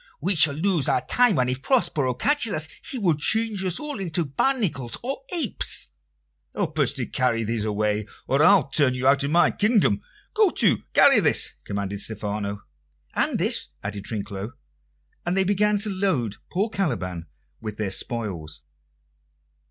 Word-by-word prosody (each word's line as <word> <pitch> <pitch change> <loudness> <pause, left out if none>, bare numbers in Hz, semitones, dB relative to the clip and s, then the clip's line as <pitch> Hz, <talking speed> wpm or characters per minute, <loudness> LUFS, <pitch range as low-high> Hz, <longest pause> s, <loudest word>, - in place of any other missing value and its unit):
"We 195 - 0
shall 150 -4 +5
lose 165 -3 +1
our - - +1
time, 245 -8 +3
and 125 - +2
if 125 +1 -2
Prospero 145 - +1
catches 285 - +1
us, 155 0 0 0.2
he 270 - -4
will 190 -8 +2
change 215 +6 0
us 185 -2 0
all 300 -6 -5
into 170 -3 -2
barnacles 150 - -1
or 270 +2 -4
apes." 345 -2 -1 0.7
"Help 160 -6 -2
us 140 -4 +3
to 125 - -3
carry 120 -3 0
these 110 0 -2
away, 105 0 -1 0.2
or 135 +2 +1
I'll 190 -6 +5
turn 140 -2 +2
you 125 +1 0
out 140 0 +4
of 140 - -1
my 170 +3 +4
kingdom. 215 0 +2 0.3
Go 425 -2 +4
to, - - +2
carry 275 -5 +7
this!" 160 -7 +2
commanded 100 0 -3
Stephano. 105 -1 -3 0.5
"And - - 0
this," - - +1 0.2
added 100 -1 -5
Trinculo; 105 +1 -5 0.7
and 175 +2 -1
they 190 - +4
began 205 +2 +2
to 210 +1 0
load 160 - 0
poor 200 +6 0
Caliban 90 - -2 0.3
with 105 -2 -6
their 105 -3 -2
spoils. 95 -9 -3
145 Hz, 160 wpm, -24 LUFS, -, 0.7 s, carry